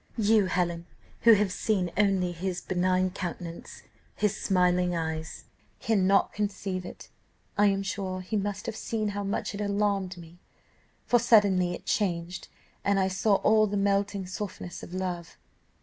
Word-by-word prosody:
You, 215 Hz, -2 st, +4 dB
Helen, 175 Hz, -1 st, -1 dB, 0.3 s
who 230 Hz, -, +7 dB
have 205 Hz, -2 st, +2 dB
seen 185 Hz, -3 st, 0 dB
only 195 Hz, -3 st, +2 dB
his 175 Hz, +1 st, -3 dB
benign 185 Hz, +1 st, +1 dB
countenance, 175 Hz, -2 st, -7 dB, 0.3 s
his 210 Hz, -1 st, +1 dB
smiling 180 Hz, -2 st, +2 dB
eyes, 160 Hz, -1 st, -4 dB, 0.4 s
cannot 195 Hz, -3 st, +2 dB
conceive 195 Hz, -3 st, -3 dB
it. -, -, -10 dB, 0.5 s
I 205 Hz, 0 st, +4 dB
am 195 Hz, 0 st, +1 dB
sure 190 Hz, -1 st, -3 dB
he 185 Hz, +4 st, -4 dB
must 205 Hz, 0 st, -2 dB
have -, -, -4 dB
seen 215 Hz, -1 st, -2 dB
how 205 Hz, 0 st, -3 dB
much 205 Hz, +2 st, -2 dB
it 200 Hz, -, -5 dB
alarmed 200 Hz, -2 st, 0 dB
me, 170 Hz, 0 st, -13 dB, 0.7 s
for 240 Hz, -, +4 dB
suddenly 200 Hz, -6 st, +4 dB
it -, -, -12 dB
changed, 175 Hz, -3 st, -1 dB, 0.4 s
and 200 Hz, 0 st, +2 dB
I 190 Hz, 0 st, +2 dB
saw 195 Hz, +2 st, +2 dB
all 215 Hz, 0 st, +5 dB
the 205 Hz, 0 st, -2 dB
melting 200 Hz, 0 st, 0 dB
softness 185 Hz, -1 st, -6 dB
of -, -, -10 dB
love. 180 Hz, -2 st, -4 dB
195 Hz, 150 wpm, -28 LUFS, 180-205 Hz, 0.7 s, who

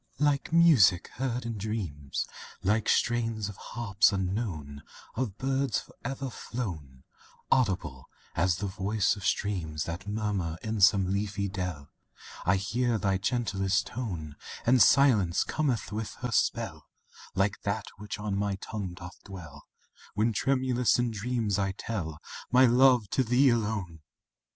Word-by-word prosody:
IV -, -, -15 dB
Like 145 Hz, -1 st, +2 dB
music 150 Hz, -, +5 dB
heard 125 Hz, -2 st, -2 dB
in 115 Hz, -2 st, -4 dB
dreams, 90 Hz, -10 st, -3 dB, 0.4 s
Like 105 Hz, +3 st, +1 dB
strains 115 Hz, -3 st, +1 dB
of 105 Hz, -, -8 dB
harps 105 Hz, -4 st, +1 dB
unknown, 90 Hz, -7 st, -3 dB, 0.3 s
Of 110 Hz, -5 st, -3 dB
birds 135 Hz, -2 st, 0 dB
forever 135 Hz, +1 st, -6 dB
flown 80 Hz, -, -6 dB, 0.5 s
Audible 95 Hz, -, 0 dB, 0.2 s
as 90 Hz, 0 st, +2 dB
the 100 Hz, +4 st, -4 dB
voice 100 Hz, +2 st, 0 dB
of 100 Hz, -, -10 dB
streams 85 Hz, -8 st, -1 dB
That 85 Hz, +4 st, -6 dB
murmur 100 Hz, -6 st, -2 dB
in 110 Hz, -2 st, -2 dB
some 95 Hz, -1 st, +5 dB
leafy 100 Hz, 0 st, -1 dB
dell, 90 Hz, -7 st, -5 dB, 0.6 s
I 90 Hz, -, +5 dB
hear 115 Hz, +5 st, 0 dB
thy 95 Hz, -2 st, 0 dB
gentlest 100 Hz, -4 st, 0 dB
tone, 85 Hz, -, -5 dB, 0.3 s
And 125 Hz, +1 st, +5 dB
Silence 110 Hz, -12 st, +5 dB
cometh 130 Hz, -9 st, -1 dB
with 110 Hz, +1 st, -4 dB
her 125 Hz, -1 st, -3 dB
spell -, -, 0 dB, 0.5 s
Like 95 Hz, +1 st, +1 dB
that 100 Hz, +1 st, -2 dB
which 105 Hz, +1 st, -6 dB
on 105 Hz, -1 st, -3 dB
my 100 Hz, 0 st, 0 dB
tongue 100 Hz, -2 st, -5 dB
doth 90 Hz, 0 st, -11 dB
dwell, 80 Hz, -8 st, -11 dB, 0.5 s
When 110 Hz, +2 st, +2 dB
tremulous 130 Hz, 0 st, +2 dB
in 120 Hz, -1 st, 0 dB
dreams 110 Hz, -2 st, -1 dB
I 95 Hz, -1 st, 0 dB
tell 90 Hz, -7 st, -4 dB, 0.3 s
My 125 Hz, +1 st, +7 dB
love 125 Hz, -2 st, +5 dB
to 130 Hz, -, +2 dB
thee 125 Hz, +3 st, +4 dB
alone! 105 Hz, -8 st, -1 dB
105 Hz, 140 wpm, -29 LUFS, 95-120 Hz, 0.6 s, My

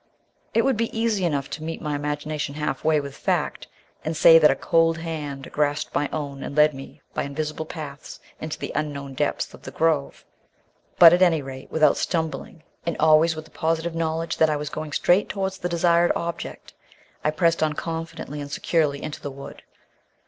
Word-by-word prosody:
It 230 Hz, -, +4 dB
would 270 Hz, -4 st, +2 dB
be 225 Hz, 0 st, -2 dB
easy 220 Hz, -5 st, +1 dB
enough 145 Hz, -5 st, -1 dB
to 155 Hz, -, -5 dB
meet 165 Hz, +1 st, -4 dB
my 150 Hz, -2 st, -3 dB
imagination 145 Hz, 0 st, -3 dB
half 150 Hz, 0 st, -3 dB
way 155 Hz, -1 st, +3 dB
with 140 Hz, -1 st, -7 dB
fact, -, -, -1 dB, 0.4 s
and 160 Hz, 0 st, -3 dB
say 165 Hz, +1 st, +8 dB
that 155 Hz, -, +6 dB
a 135 Hz, -, +3 dB
cold 165 Hz, +2 st, +2 dB
hand 150 Hz, -5 st, -5 dB
grasped 150 Hz, 0 st, 0 dB
my 145 Hz, -, 0 dB
own 140 Hz, -3 st, -4 dB
and 140 Hz, -, -6 dB
led 150 Hz, 0 st, +5 dB
me 135 Hz, +2 st, -11 dB
by -, -, -1 dB
invisible 155 Hz, +2 st, -4 dB
paths 150 Hz, -4 st, -8 dB, 0.2 s
into 155 Hz, 0 st, -5 dB
the -, -, -5 dB
unknown 140 Hz, -3 st, -3 dB
depths -, -, -1 dB
of -, -, -13 dB
the -, -, -8 dB
grove; 160 Hz, -4 st, 0 dB, 0.7 s
but 165 Hz, -1 st, +10 dB
at 175 Hz, -, +3 dB
any 165 Hz, -5 st, +4 dB
rate, 130 Hz, 0 st, -9 dB
without 155 Hz, -2 st, +4 dB
stumbling, 160 Hz, -1 st, -3 dB, 0.2 s
and 170 Hz, -, -2 dB
always 160 Hz, +1 st, +5 dB
with 155 Hz, 0 st, -7 dB
the -, -, -19 dB
positive 165 Hz, +1 st, -1 dB
knowledge 165 Hz, 0 st, -2 dB
that 160 Hz, -, +4 dB
I 150 Hz, -, +1 dB
was 150 Hz, 0 st, -4 dB
going 155 Hz, -1 st, -5 dB
straight 180 Hz, +6 st, +3 dB
towards 190 Hz, -1 st, -3 dB
the 175 Hz, -, -2 dB
desired 170 Hz, 0 st, +3 dB
object, 170 Hz, 0 st, -5 dB, 0.5 s
I 150 Hz, -, +3 dB
pressed 165 Hz, +2 st, +2 dB
on 155 Hz, -1 st, +2 dB
confidently 165 Hz, -2 st, -5 dB
and 145 Hz, 0 st, -7 dB
securely 150 Hz, -4 st, 0 dB
into 150 Hz, -, -6 dB
the 145 Hz, -, -4 dB
wood. 140 Hz, 0 st, -10 dB
155 Hz, 190 wpm, -24 LUFS, 145-165 Hz, 0.7 s, but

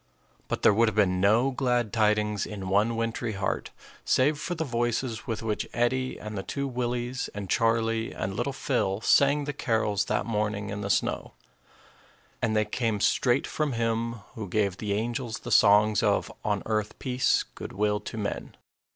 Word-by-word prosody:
But -, -, -3 dB
there -, -, +7 dB
would 115 Hz, +3 st, +4 dB
have 110 Hz, -, -1 dB
been 95 Hz, -3 st, +2 dB
no 115 Hz, +7 st, +4 dB
glad 125 Hz, -5 st, 0 dB
tidings 105 Hz, -2 st, +1 dB
in 100 Hz, -3 st, -6 dB
one 105 Hz, +4 st, +2 dB
wintry 115 Hz, 0 st, -2 dB
heart 95 Hz, -1 st, -2 dB, 0.3 s
save 145 Hz, +3 st, +2 dB
for 175 Hz, -, -3 dB
the 160 Hz, -, -1 dB
voices 120 Hz, -2 st, -2 dB
with 115 Hz, -1 st, -3 dB
which 110 Hz, -2 st, -2 dB
Eddie 130 Hz, +2 st, 0 dB
and 105 Hz, 0 st, -7 dB
the 95 Hz, -, -2 dB
two 140 Hz, +7 st, -3 dB
Willies 125 Hz, 0 st, -2 dB
and 100 Hz, -1 st, -5 dB
Charlie 115 Hz, 0 st, +1 dB
and 95 Hz, +1 st, -4 dB
little 120 Hz, +6 st, -1 dB
Phil 120 Hz, -8 st, -1 dB
sang 140 Hz, +4 st, +4 dB
the 145 Hz, +1 st, -3 dB
carols 110 Hz, -6 st, 0 dB
that -, -, -1 dB
morning 105 Hz, -2 st, -2 dB
in 105 Hz, 0 st, -4 dB
the 100 Hz, -, -3 dB
snow; -, -, 0 dB, 1.1 s
and 110 Hz, -2 st, +1 dB
they 105 Hz, 0 st, +3 dB
came 115 Hz, -3 st, -1 dB
straight 125 Hz, +5 st, +2 dB
from 150 Hz, -3 st, -1 dB
Him 115 Hz, 0 st, 0 dB, 0.2 s
who 105 Hz, -4 st, -6 dB
gave 100 Hz, -1 st, 0 dB
the 105 Hz, -2 st, -2 dB
angels 115 Hz, +2 st, -3 dB
the -, -, -6 dB
songs 105 Hz, 0 st, +5 dB
of, -, -, +1 dB
"On 105 Hz, -2 st, 0 dB
earth 110 Hz, -1 st, -1 dB
peace, 125 Hz, 0 st, +1 dB
good -, -, -7 dB
will 105 Hz, +1 st, +1 dB
to 110 Hz, -, -7 dB
men." 100 Hz, -2 st, -4 dB
115 Hz, 175 wpm, -27 LUFS, 105-120 Hz, 1.1 s, there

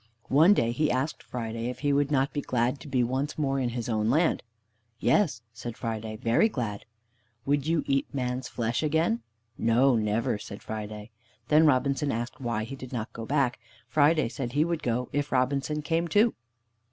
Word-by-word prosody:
One 165 Hz, +8 st, +7 dB
day 115 Hz, -8 st, +2 dB
he 150 Hz, +6 st, +1 dB
asked 130 Hz, +5 st, -1 dB
Friday 115 Hz, -1 st, -4 dB
if 125 Hz, 0 st, -7 dB
he 145 Hz, -1 st, +2 dB
would 145 Hz, 0 st, +2 dB
not 135 Hz, -1 st, +1 dB
be 145 Hz, -, -1 dB
glad 125 Hz, +1 st, 0 dB
to -, -, -11 dB
be 130 Hz, -3 st, +1 dB
once 130 Hz, +5 st, -2 dB
more 135 Hz, -3 st, 0 dB
in 125 Hz, -2 st, 0 dB
his 120 Hz, -1 st, -4 dB
own 110 Hz, -2 st, +1 dB
land. 160 Hz, +6 st, +2 dB, 0.6 s
"Yes" 140 Hz, -, +2 dB
said 120 Hz, +1 st, -7 dB
Friday; 110 Hz, -2 st, -4 dB
"very 120 Hz, -, +3 dB
glad." 115 Hz, -, -4 dB, 0.6 s
"Would 145 Hz, +1 st, +1 dB
you 165 Hz, -1 st, +2 dB
eat 135 Hz, 0 st, 0 dB
man's 125 Hz, -2 st, -2 dB
flesh 115 Hz, -1 st, -1 dB
again?" 155 Hz, -6 st, +1 dB, 0.4 s
"No, 120 Hz, +4 st, +4 dB
never," 110 Hz, +1 st, 0 dB
said 100 Hz, -1 st, -9 dB
Friday. 105 Hz, 0 st, -6 dB, 0.4 s
Then 155 Hz, +1 st, +6 dB
Robinson 140 Hz, +1 st, +2 dB
asked 120 Hz, +5 st, -4 dB
why 115 Hz, -3 st, -1 dB
he 120 Hz, +5 st, -6 dB
did 130 Hz, -2 st, -9 dB
not 115 Hz, -2 st, -4 dB
go 115 Hz, 0 st, -7 dB
back. 135 Hz, -4 st, +1 dB, 0.3 s
Friday 155 Hz, -1 st, +3 dB
said 120 Hz, 0 st, -5 dB
he 150 Hz, +2 st, +3 dB
would 170 Hz, -2 st, -2 dB
go 125 Hz, +1 st, -1 dB
if 145 Hz, +1 st, -1 dB
Robinson 140 Hz, +4 st, 0 dB
came 165 Hz, +2 st, 0 dB
too. 215 Hz, +6 st, +4 dB
130 Hz, 185 wpm, -28 LUFS, 115-145 Hz, 0.6 s, One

